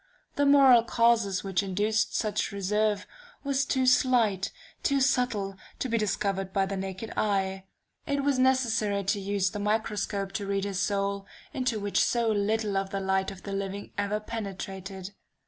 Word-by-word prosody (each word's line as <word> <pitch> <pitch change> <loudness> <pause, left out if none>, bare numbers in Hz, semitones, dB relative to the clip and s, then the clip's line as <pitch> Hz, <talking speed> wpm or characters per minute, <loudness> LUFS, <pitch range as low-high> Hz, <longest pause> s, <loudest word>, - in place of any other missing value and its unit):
The 285 0 +2
moral 270 -4 +7
causes 230 -5 +2
which 195 -1 0
induced 205 +3 0
such 210 -2 -1
reserve 205 +1 0 0.4
were 280 -1 -1
too 265 -1 +1
slight, 245 -6 +3 0.3
too 280 -1 +2
subtle, 245 -7 +1 0.2
to - - -2
be 230 -1 0
discovered 195 -2 -1
by 195 0 +1
the 195 +1 -4
naked 190 +3 -5
eye. 195 -2 0 0.4
It 280 -1 0
was 280 -2 +1
necessary 230 -6 +2
to 200 +2 0
use 195 -1 0
the 210 - -5
microscope 210 -2 -1
to 200 0 -4
read 195 0 0
his 200 -2 -2
soul, 200 0 -1 0.3
into 250 -4 -1
which 205 0 +1
so 235 -2 +1
little 210 0 0
of 195 0 -1
the 195 - -3
light 190 0 0
of 195 -1 -11
the 200 - -5
living 195 0 -4
ever 205 +1 -1
penetrated.... 195 -3 -6
205 Hz, 165 wpm, -28 LUFS, 195-230 Hz, 0.4 s, moral